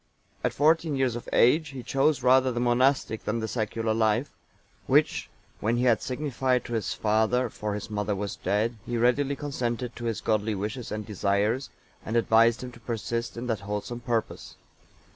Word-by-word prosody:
(893) - - +3
At - - -16
fourteen 155 +1 +3
years 130 -3 +1
of 120 - -7
age 150 +6 +4
he 130 -2 -8
chose 135 0 +1
rather 130 0 +5
the 120 - -2
monastic 125 -1 +2
than 110 +2 -1
the 110 - -2
secular 110 -1 -1
life; 110 +4 +1 0.6
which, - - +2 0.3
when 115 +3 0
he 120 - +1
had 120 -3 +3
signified 130 -2 -1
to 120 - -6
his 110 -2 -1
father, 110 +3 +1
for 105 -1 -3
his 105 +1 -6
mother 105 -1 -1
was 100 0 -4
dead, 105 +5 -1
he 120 0 -3
readily 135 +4 +2
consented 125 -4 -3
to 120 - -6
his 115 -2 -1
godly 110 -1 0
wishes 105 +5 -4
and 105 0 -4
desires, 105 +5 0 0.3
and 110 - -4
advised 115 +1 +4
him 125 - -6
to 115 - -15
persist 115 +1 -3
in 120 - -4
that 115 -4 -1
wholesome 105 +4 -4
purpose. 120 -3 -3
120 Hz, 180 wpm, -27 LUFS, 110-125 Hz, 0.6 s, rather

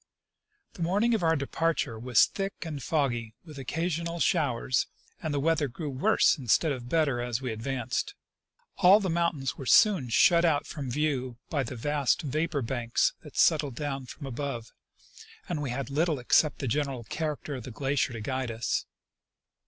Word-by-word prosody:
The 180 - -10
morning 205 +8 +2
of 220 - +1
our 165 -1 +3
departure 140 -4 -1
was 125 +1 +5
thick 195 -3 -5
and 150 -4 -5
foggy, 120 -7 -1
with 155 -3 -11
occa 145 +5 -3
sional 170 0 -2
showers, 130 -7 +1 0.3
and 160 -3 -2
the 145 - 0
weather 160 0 +2
grew 145 +4 -5
worse 130 +2 +3
instead 135 +5 +2
of 125 -3 -5
better 145 -6 +1
as 120 -1 -2
we 130 -3 -3
advanced. 125 - -3 0.6
All 195 +2 +7
the 190 -4 -1
mountains 165 -6 -1
were 135 - -7
soon 195 - +5
shut 170 +8 +5
out 155 -4 +2
from 140 -5 -6
view 130 -3 -1
by 145 - +1
the 130 0 -5
vast 145 +4 0
vapor 155 0 -1
banks 120 -1 0
that - - -13
settled 145 -5 +3
down 135 -2 -4
from 140 - -9
above, 130 -3 -5 0.8
and 165 -4 -2
we 140 - -3
had 135 +2 -4
little 155 +2 +1
except 140 +4 +3
the 135 - -3
general 135 -1 -1
character 150 +4 -4
of 130 -4 -6
the - - -7
glacier 135 +3 0
to 115 -2 -6
guide 130 +2 -2
us. 115 0 -2
140 Hz, 175 wpm, -28 LUFS, 125-160 Hz, 0.8 s, All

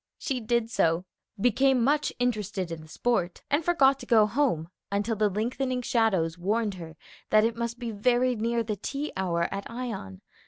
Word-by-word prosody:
She 270 -5 -2
did 235 0 0
so, 165 -4 +2 0.3
became 250 +3 +3
much 295 +4 +2
interested 210 -7 -1
in 165 -1 -5
the 155 - -13
sport, 180 -1 -1
and 290 +3 +2
forgot 275 -6 +4
to 245 - -10
go 220 -3 +6
home 215 - 0 0.2
until 205 +3 0
the 210 0 +2
lengthening 250 +5 -2
shadows 190 -9 +1
warned 210 +3 0
her 165 -3 -9 0.3
that 215 0 +5
it 230 0 0
must 235 0 -3
be 240 -2 -4
very 245 +4 +2
near 230 +1 0
the 210 -2 -3
tea 285 +7 -4
hour 170 -3 0
at 195 0 -5
Ion. 225 - -6
225 Hz, 180 wpm, -27 LUFS, 195-250 Hz, 0.3 s, go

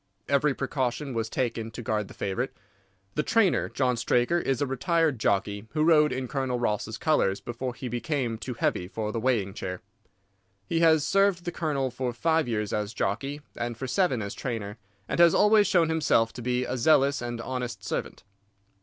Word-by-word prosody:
Every 140 0 +2
precaution 135 0 -2
was 115 -1 -2
taken 115 -3 -2
to 120 +2 -8
guard 105 -2 -1
the - - -13
favourite. 115 +7 -2 0.6
The - - +1
trainer, 200 +2 +2
John 125 -2 +1
Straker, 120 +7 +2
is 135 -6 -1
a 145 - +1
retired 140 +1 +1
jockey 100 +1 0
who 155 -1 +1
rode 155 -2 +5
in 130 0 -3
Colonel 130 -2 -2
Ross's 110 -1 -1
colours 100 -11 +1
before 120 +1 -5
he 130 - -6
became 120 -1 -2
too 125 0 -5
heavy 90 -5 0
for 105 +1 -4
the 115 - -2
weighing 110 -5 0
chair. 90 -2 -5 0.8
He 165 - 0
has 160 -3 +4
served 195 -3 +2
the 175 - -2
Colonel 140 -6 -1
for 125 0 -3
five 160 +4 +1
years 105 -3 -2
as 105 +1 -2
jockey 135 +9 -2
and 120 -1 -4
for 135 - -4
seven 130 - +1
as 100 - -5
trainer, 115 -4 -5 0.3
and - - -2
has 170 -1 +7
always 210 0 +5
shown 170 -4 +3
himself 150 -8 +2
to 125 - -8
be 125 +1 0
a 130 - -3
zealous 140 +1 +3
and 120 -1 -4
honest 120 -4 -4
servant. - - -4
125 Hz, 185 wpm, -27 LUFS, 115-150 Hz, 0.8 s, has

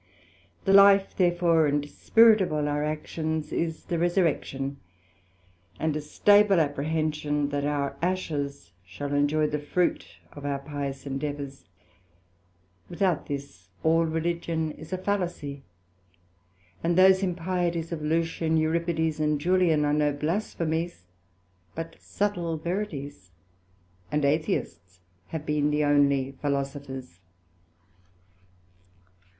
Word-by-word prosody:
The 195 - +3
life 200 0 +6
therefore 175 -3 +3
and 145 0 0
spirit 225 +7 +5
of 185 - 0
all 150 -1 0
our 145 0 0
actions, 155 +1 -3
is 165 -1 -2
the 170 - -2
resurrection, 155 -6 0 1.0
and 155 -1 0
a 155 - -2
stable 205 +5 +4
apprehension 150 -1 -1
that 145 0 -2
our 140 -1 -1
ashes 145 - -2
shall 120 +11 -6
enjoy 145 +2 +2
the 150 0 -1
fruit 170 +4 -1 0.2
of 145 - -10
our 140 -1 -1
pious 140 -1 -5
endeavours: 140 0 -5 1.2
without 180 -2 0
this, 140 -11 -7
all 165 +1 +3
Religion 165 0 -1
is 155 +2 -12
a 185 - -1
fallacy, 175 -8 -3 1.2
and 170 +1 +1
those 190 0 +6
impieties 175 -2 -1
of 165 -2 -4
Lucian, 165 +1 0
Euripides, 160 0 0
and 150 -1 +1
Julian, 170 -2 +3
are 145 - +1
no 150 -1 +2
blasphemies, 165 - -2 0.7
but 165 0 -6
subtle 175 -5 -2
verities, 155 - -5 0.8
and 150 -1 +1
Atheists 95 - -1 0.3
have 160 -2 -5
been 150 -1 +1
the 150 0 +1
onely 140 -2 +3
Philosophers. 140 - -4
155 Hz, 110 wpm, -27 LUFS, 145-170 Hz, 1.2 s, life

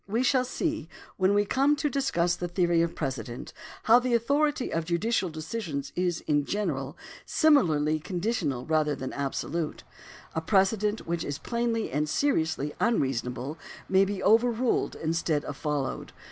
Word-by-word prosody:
We 225 +5 0
shall 255 0 +3
see, 305 - -2 0.3
when 190 +1 +3
we 205 0 +3
come 275 +7 +3
to 295 +1 -1
discuss 240 -11 +1
the 175 0 -4
theory 175 -1 +2
of 170 0 -1
precedent, 125 -4 -5 0.3
how 230 +2 +7
the 250 -1 +1
authority 285 +3 +1
of 165 - 0
judicial 185 +4 0
decisions 155 -3 -5
is, 175 -2 0
in 145 -1 +1
general, 150 -6 -2 0.3
similarly 155 - +3
conditional 175 - -2
rather 155 -2 +1
than 130 -1 -5
absolute; 150 +3 -3 0.5
a 160 - -1
precedent 205 +4 +1
which 170 0 -2
is 145 -1 -3
plainly 235 -2 -1
and 150 +3 0
seriously 160 - 0
unreasonable 135 - -1 0.3
may 190 0 +4
be 195 0 -3
overruled 235 +3 +2
instead 160 -2 -1
of 145 - -5
followed. 145 -2 -3
175 Hz, 145 wpm, -28 LUFS, 150-230 Hz, 0.5 s, how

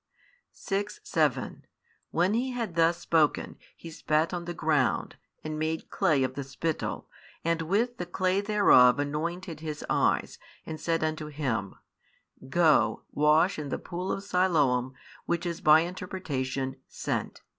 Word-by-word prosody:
6, 205 +1 -3
7 - - 0 0.5
When 180 +4 +1
He 250 +3 0
had 230 -7 -3
thus 165 +1 +3
spoken, 160 -4 +1 0.2
He 165 - -10
spat 155 +1 0
on 175 -1 -3
the 175 - -4
ground, 150 -4 +1 0.3
and 155 0 -4
made 160 +1 -3
clay 155 -9 +2
of 130 0 -1
the 140 - -4
spittle, 145 +4 -3 0.4
and 165 0 +1
with 220 +9 0
the 180 - -5
clay 185 +2 +1
thereof 200 - +5
anointed 160 +4 -3
his 155 -1 -6
eyes, - - +1 0.3
and 155 -1 -6
said 165 0 0
unto 155 -1 -2
him, 130 -10 -3 0.7
Go, 150 -10 +3
wash 155 +5 +3
in 145 -2 -5
the - - -2
pool 180 +1 -5
of 195 - -3
Siloam 145 -10 +1 0.3
(which 170 +1 -1
is 170 -1 -3
by 155 +1 +7
interpretation, 145 -8 -4
Sent.) - - -4
160 Hz, 145 wpm, -28 LUFS, 150-180 Hz, 0.7 s, by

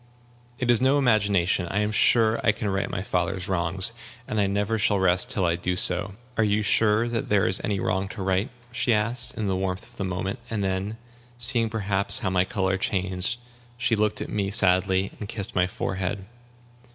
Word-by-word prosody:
"It 125 -1 +2
is 120 0 +3
no 135 +2 +4
imagination. 100 -8 +2
I 100 +4 0
am 105 0 0
sure 110 +1 +4
that - - -6
I 110 - +6
can 105 -1 -3
right 95 0 -1
my 95 - -3
father's 90 0 -1
wrongs. 95 +3 +1 0.3
And 110 - 0
I 100 - +2
never 105 +3 -1
shall 105 0 +2
rest 95 -1 +2
till 95 - 0
I 85 -1 +2
do 90 +1 -2
so." 95 +2 +2 0.2
"Are 110 - +3
you 105 0 +1
sure 110 +1 +3
that 115 -1 -3
there 105 -2 +3
is 95 - 0
any 100 -2 -1
wrong 95 +1 -1
to 100 -2 -6
right?" 95 +2 0 0.2
she 120 -1 +1
asked, 115 +3 -2
in 110 - -2
the 95 - 0
warmth 95 +2 -2
of 120 +1 -20
the - - -3
moment; 95 +4 -3
and 105 -3 -2
then, 95 +3 -2 0.4
seeing 120 -1 +1
perhaps 100 -2 +2
how 105 -8 -1
my 90 0 +2
color 95 0 -1
changed, 95 +4 -1 0.4
she 115 -2 +1
looked 105 0 0
at - - -5
me 100 -2 -1
sadly, 95 0 +2
and 105 - -6
kissed 100 -4 -5
my 90 0 +2
forehead. 95 -2 -3
100 Hz, 205 wpm, -25 LUFS, 95-110 Hz, 0.4 s, I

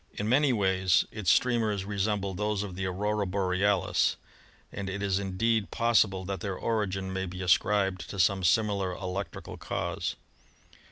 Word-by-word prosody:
In 105 - -3
many 135 +4 +4
ways 95 -4 +2
its 105 -5 -2
streamers 110 -6 +2
resemble 100 -1 -1
those 105 +1 -1
of 100 -3 -6
the 95 0 -2
Aurora 105 +2 -1
Borealis, 95 0 +1 0.6
and 100 -1 -5
it 100 +1 -4
is 100 -1 +1
indeed 100 +3 0
possible 105 -5 +2
that 95 +1 -3
their 95 -3 -4
origin 95 -4 -2
may 95 0 -2
be 90 +1 -6
ascribed 95 +2 +2
to 100 - -6
some 95 +1 +2
similar 100 0 +2
electrical 95 +2 -5
cause. - - -3
100 Hz, 150 wpm, -28 LUFS, 95-105 Hz, 0.6 s, many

